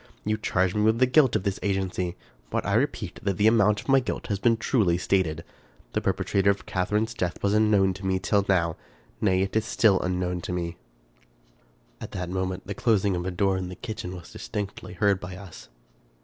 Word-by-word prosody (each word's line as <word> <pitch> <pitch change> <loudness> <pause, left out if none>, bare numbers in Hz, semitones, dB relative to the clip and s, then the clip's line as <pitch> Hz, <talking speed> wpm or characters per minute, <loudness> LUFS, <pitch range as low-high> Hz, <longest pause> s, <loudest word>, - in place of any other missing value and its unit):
You 105 +1 +1
charge 95 -4 0
me 105 - 0
with 110 +1 +3
the 130 - +5
guilt 130 0 +4
of - - +1
this 100 -1 -2
agency; 95 -3 -1 0.3
but - - -2
I - - 0
repeat - - -1
that 100 -2 -1
the 105 - +2
amount 105 -2 +4
of - - -17
my 135 -1 +5
guilt 125 - -4
has 100 -2 -1
been 115 +1 +3
truly 105 -6 +2
stated. 85 -4 0 0.5
The - - 0
perpetrator 100 0 +1
of 100 - 0
Catharine's 105 +5 -1
death 90 -6 -3
was 100 0 +2
unknown 105 -3 +3
to 95 +1 -9
me 95 0 +2
till 95 +2 +1
now; 85 -4 +2 0.4
nay, 95 -2 +3
it 95 - -4
is 110 - +3
still 110 -3 +3
unknown 90 -1 -1
to - - -5
me." 85 -1 -3 1.3
At - - -8
that 90 -1 -4
moment, 95 0 -3
the 100 - -4
closing 100 -3 +2
of 90 +1 -3
a - - 0
door 95 +1 +1
in 90 -1 -4
the 90 - -7
kitchen 95 -4 -6
was 85 -2 -11
distinctly 105 -1 -5
heard 100 -2 +2
by 90 0 -7
us. 90 -11 -12
95 Hz, 205 wpm, -26 LUFS, 90-105 Hz, 1.3 s, the